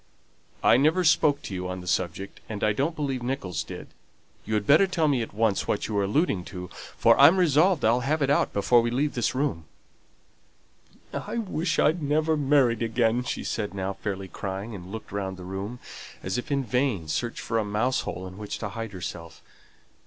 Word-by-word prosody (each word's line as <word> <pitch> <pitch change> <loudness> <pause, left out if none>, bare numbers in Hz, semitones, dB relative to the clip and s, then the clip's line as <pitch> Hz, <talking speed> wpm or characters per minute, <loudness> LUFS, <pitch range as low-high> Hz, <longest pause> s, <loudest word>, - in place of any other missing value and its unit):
"I - - +6
never 155 +7 +3
spoke 150 -3 +3
to - - -6
you 90 -1 -3
on 90 0 -5
the - - -11
subject, 95 +2 -2
and 105 -2 -5
I 105 - +3
don't 145 +9 -1
believe 135 -5 -2
Nicholls 120 - -3
did. - - -9 0.6
You'd 105 -2 -1
better 155 - +6
tell 170 -4 +1
me 135 -4 +2
at 115 - -5
once 105 -1 0
what 105 - -1
you're 105 -2 0
alluding 100 - +1
to, 90 -2 -7 0.3
for - - +5
I'm 180 - +8
resolved 170 - +3
I'll 115 +3 +4
have 145 +4 0
it 140 - +2
out 145 - +2
before 120 +4 +4
we 120 - 0
leave 140 +5 0
this 120 +1 -1
room." 130 - -1 1.5
"I - - -4
wish 180 -6 -1
I'd 160 +3 +3
never 155 +2 +1
married 135 -6 +3
again," 115 +1 +1
she - - -4
said, 105 -3 -3
now 95 0 -2
fairly 95 -1 -5
crying, 95 +5 -5
and 95 -2 -9
looking 110 -2 -7
round 95 -2 -3
the 90 - -9
room, 95 +6 -5 0.5
as 95 +1 -2
if 125 - -7
in 140 -1 +1
vain 125 - 0
search 120 +9 -2
for 115 0 -1
a - - 0
mouse 110 +5 0
hole 90 +2 -5
in 95 +2 -9
which 105 -1 -5
to 105 - -4
hide 115 0 -6
herself. 85 -3 -7
115 Hz, 195 wpm, -26 LUFS, 100-140 Hz, 1.5 s, I'm